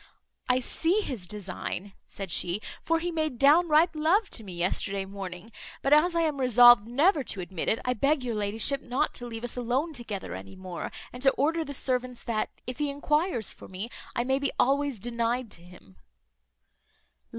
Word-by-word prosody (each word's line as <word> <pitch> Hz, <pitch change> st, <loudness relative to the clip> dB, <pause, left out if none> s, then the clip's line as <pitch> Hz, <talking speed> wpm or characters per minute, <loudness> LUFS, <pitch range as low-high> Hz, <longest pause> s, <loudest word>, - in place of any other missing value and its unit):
"I 250 Hz, +1 st, +3 dB
see 340 Hz, -, +1 dB
his 235 Hz, -, -5 dB
design," 195 Hz, -1 st, -5 dB
said 195 Hz, -3 st, -7 dB
she; 175 Hz, +4 st, +2 dB, 0.2 s
"for 330 Hz, -, +2 dB
he 345 Hz, +2 st, -3 dB
made 310 Hz, -6 st, -2 dB
downright 315 Hz, +4 st, +5 dB
love 355 Hz, +8 st, +2 dB
to 225 Hz, -, -6 dB
me 190 Hz, -3 st, -8 dB
yesterday 190 Hz, +3 st, 0 dB
morning; 195 Hz, +1 st, -8 dB, 0.3 s
but 275 Hz, -, +3 dB
as 335 Hz, +4 st, +4 dB
I 335 Hz, -, +3 dB
am 305 Hz, -4 st, 0 dB
resolved 240 Hz, -3 st, +7 dB
never 290 Hz, +5 st, +3 dB
to -, -, -4 dB
admit 180 Hz, -1 st, -3 dB
it, 220 Hz, -, +2 dB
I 250 Hz, -, +1 dB
beg 275 Hz, +4 st, +1 dB
your 240 Hz, -2 st, -2 dB
ladyship 220 Hz, +6 st, +1 dB
not 260 Hz, +5 st, -1 dB
to 245 Hz, -, -6 dB
leave 225 Hz, -1 st, -7 dB
us 245 Hz, -, -2 dB
alone 255 Hz, +7 st, -1 dB
together 225 Hz, -7 st, -4 dB
any 95 Hz, +1 st, -9 dB
more, 185 Hz, -2 st, -6 dB, 0.2 s
and 250 Hz, -, -9 dB
to 270 Hz, -, +6 dB
order 320 Hz, +5 st, +1 dB
the 285 Hz, -2 st, -6 dB
servants 250 Hz, -1 st, -1 dB
that, 220 Hz, -2 st, -1 dB, 0.2 s
if 250 Hz, +2 st, -6 dB
he 295 Hz, -1 st, 0 dB
enquires 295 Hz, -, 0 dB
for -, -, -13 dB
me, 195 Hz, +6 st, -6 dB, 0.2 s
I 240 Hz, -, +1 dB
may 265 Hz, +2 st, +1 dB
be 280 Hz, -1 st, -1 dB
always 275 Hz, -2 st, +2 dB
denied 235 Hz, +1 st, -2 dB
to 170 Hz, -, -11 dB
him." 170 Hz, -, -17 dB
245 Hz, 185 wpm, -28 LUFS, 205-295 Hz, 0.3 s, resolved